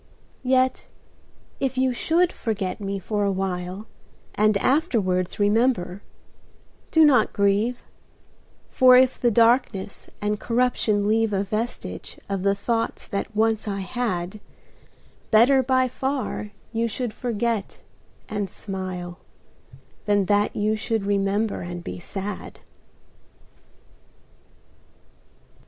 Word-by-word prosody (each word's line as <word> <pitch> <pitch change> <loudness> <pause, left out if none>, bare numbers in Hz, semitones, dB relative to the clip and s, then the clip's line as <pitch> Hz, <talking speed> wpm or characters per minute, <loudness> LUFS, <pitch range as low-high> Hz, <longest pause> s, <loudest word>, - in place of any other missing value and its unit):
Yet 255 0 +1 0.7
if 265 -1 -1
you 260 -1 +2
should 335 +7 +2
forget 205 -3 -3
me 200 0 -2
for 205 +2 -2
a 200 - +2
while 185 +1 -3 0.5
And 215 0 +3
afterwards 205 - +1
remember, 205 -3 +1 0.9
do 320 -1 +6
not 255 -7 +4
grieve: 205 +5 +1 0.8
For 255 -1 +6
if 255 0 +3
the 240 - +4
darkness 230 -3 +2
and 210 0 -1
corruption 230 -4 +1
leave 220 0 +2
A 195 0 +1
vestige 215 +4 -4
of 195 -2 -2
the 200 +1 +2
thoughts 230 +2 -2
that 200 +2 -4
once 220 0 +1
I 200 -1 -2
had, 190 -2 -3 0.9
Better 250 +5 +6
by 255 0 +2
far 265 -4 -3 0.2
you 230 +1 +1
should 230 0 -3
forget 230 -3 -2 0.4
and 205 -2 -3
smile 185 -2 -6 0.9
Than 205 -2 +2
that 205 +1 +1
you 215 +1 +1
should 220 -1 -2
remember 200 +1 0
and 175 0 -6
be - - -6
sad. 195 +3 -6
215 Hz, 110 wpm, -24 LUFS, 195-245 Hz, 0.9 s, do